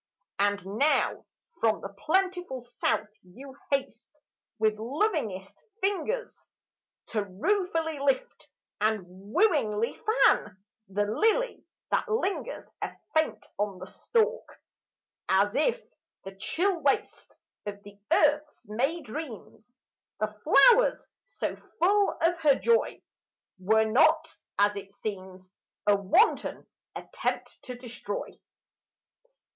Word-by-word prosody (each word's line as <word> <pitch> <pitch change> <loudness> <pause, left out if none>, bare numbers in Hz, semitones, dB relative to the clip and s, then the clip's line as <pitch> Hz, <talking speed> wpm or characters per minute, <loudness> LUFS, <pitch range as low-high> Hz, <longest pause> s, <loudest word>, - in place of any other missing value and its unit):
And 205 -1 +1
now 235 +11 +1 0.3
from 225 -1 +2
the 195 - -6
plentiful 355 - -1
South 240 -3 -1
you 260 +9 -13
haste, 275 -1 -3 0.4
With 215 -1 +1
lovingest 235 - -1 0.3
fingers, 410 +5 -2 0.6
To 215 -3 0
ruefully 325 - -1
lift 280 - -1 0.3
and 215 -3 +1
wooingly 215 - +1
fan 210 - +3 0.3
The 205 +2 0
lily 450 - +1 0.3
that - - +1
lingers 435 +2 -2 0.2
a - - -2 0.2
faint 315 0 +1
on 205 -2 -1
the - - -8
stalk: 455 -2 -1 0.7
As 200 +2 +3
if 310 - +2 0.4
the 195 - -8
chill 350 - 0
waste 280 - -1 0.3
Of 205 0 -6
the 205 0 -14
earth's 300 -3 +2
May 270 +11 -1
dreams, 245 -3 -9 0.4
The - - -1
flowers - - +5 0.2
so - - -3 0.2
full 400 +4 +3
of 340 +1 +2
her 295 -4 +5
joy, 465 - +1 0.6
Were 220 +4 +3
not 315 +8 +3 0.2
as 205 0 +3
it 200 0 -8
seems 185 -3 -7 0.3
A 205 - +5
wanton 200 - +2 0.3
attempt - - -4
to 250 - -6
destroy. 240 -4 -6
255 Hz, 110 wpm, -28 LUFS, -, 0.7 s, flowers